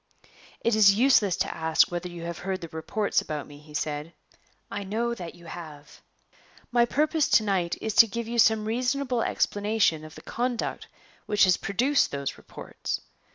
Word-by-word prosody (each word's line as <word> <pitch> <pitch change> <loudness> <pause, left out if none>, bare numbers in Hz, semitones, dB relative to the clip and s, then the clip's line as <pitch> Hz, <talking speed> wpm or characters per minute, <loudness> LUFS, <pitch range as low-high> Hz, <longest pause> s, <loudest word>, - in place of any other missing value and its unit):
"It 230 - +1
is 205 -2 +6
useless 220 -6 +4
to - - -1
ask 160 +1 +2
whether 175 +1 -4
you 170 -1 -8
have 170 0 -5
heard 190 0 -3
the 170 - -6
reports 200 +7 -1
about 150 -2 -5
me," 145 0 -13
he 150 0 -14
said; 150 +2 -3 0.6
"I 205 - -4
know 230 +4 -1
that 175 -8 -8
you 170 -1 -16
have. 155 -3 -10 0.7
My 240 -1 +4
purpose 300 +4 +1
to 220 - +5
night 190 -5 0
is 220 - -2
to 230 - +9
give 230 +2 -4
you 235 0 -2
some 220 -1 +4
reasonable 250 +2 0
explanation 205 -9 +1
of 155 0 -11
the - - -12
conduct 245 -1 -3 0.4
which 210 -1 +3
has 185 -2 +5
produced 260 +8 +1
those 140 -1 -4
reports. - - -6
200 Hz, 175 wpm, -26 LUFS, 170-235 Hz, 0.7 s, to